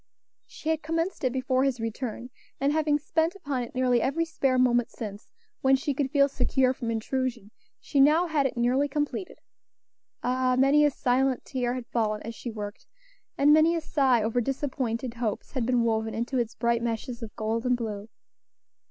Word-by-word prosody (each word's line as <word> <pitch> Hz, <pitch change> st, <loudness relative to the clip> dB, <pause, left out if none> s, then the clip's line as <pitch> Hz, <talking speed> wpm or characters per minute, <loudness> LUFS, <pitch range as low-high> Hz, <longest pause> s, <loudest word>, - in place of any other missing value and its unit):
She 315 Hz, -, -6 dB
had 320 Hz, -1 st, +1 dB
commenced 330 Hz, +3 st, -2 dB
it 255 Hz, -, +2 dB
before 260 Hz, 0 st, +1 dB
his 270 Hz, -3 st, 0 dB
return, 230 Hz, +2 st, -4 dB, 0.3 s
and 280 Hz, +2 st, +2 dB
having 305 Hz, -1 st, +2 dB
spent 320 Hz, +4 st, 0 dB
upon 280 Hz, -9 st, -3 dB
it 240 Hz, -, -7 dB
nearly 250 Hz, -2 st, +2 dB
every 330 Hz, +7 st, 0 dB
spare 270 Hz, -5 st, 0 dB
moment 245 Hz, -2 st, +3 dB
since, 210 Hz, -1 st, -8 dB, 0.3 s
when 265 Hz, 0 st, +5 dB
she 275 Hz, +2 st, -1 dB
could 270 Hz, 0 st, -1 dB
feel 280 Hz, 0 st, +4 dB
secure 265 Hz, -2 st, +1 dB
from 240 Hz, -3 st, -5 dB
intrusion, 230 Hz, -1 st, -2 dB, 0.3 s
she 285 Hz, -, -1 dB
now 305 Hz, +5 st, +5 dB
had 300 Hz, -5 st, +1 dB
it 250 Hz, -, -8 dB
nearly 250 Hz, +4 st, +2 dB
completed. 295 Hz, +6 st, -3 dB, 0.9 s
Ah! 255 Hz, 0 st, +1 dB
many 275 Hz, +3 st, +5 dB
a 295 Hz, -, +5 dB
silent 260 Hz, -1 st, 0 dB
tear 245 Hz, -2 st, -2 dB
had 250 Hz, -2 st, -5 dB
fallen 215 Hz, -3 st, -1 dB
as 230 Hz, -, -6 dB
she 240 Hz, -, -7 dB
worked, 210 Hz, -2 st, -7 dB, 0.5 s
and 290 Hz, +2 st, +5 dB
many 315 Hz, +2 st, +5 dB
a 330 Hz, -, -1 dB
sigh 265 Hz, -7 st, +2 dB
over 230 Hz, +3 st, +1 dB
disappointed 255 Hz, -2 st, -2 dB
hopes 230 Hz, -3 st, -3 dB
had 250 Hz, -4 st, -2 dB
been 245 Hz, -2 st, +2 dB
woven 220 Hz, -1 st, 0 dB
into 240 Hz, +3 st, -1 dB
its 230 Hz, -2 st, -2 dB
bright 235 Hz, 0 st, +1 dB
meshes 235 Hz, +1 st, -3 dB
of 225 Hz, -2 st, -8 dB
gold 225 Hz, +1 st, -2 dB
and 250 Hz, -1 st, +2 dB
blue. 215 Hz, -2 st, -5 dB
255 Hz, 185 wpm, -27 LUFS, 235-280 Hz, 0.9 s, when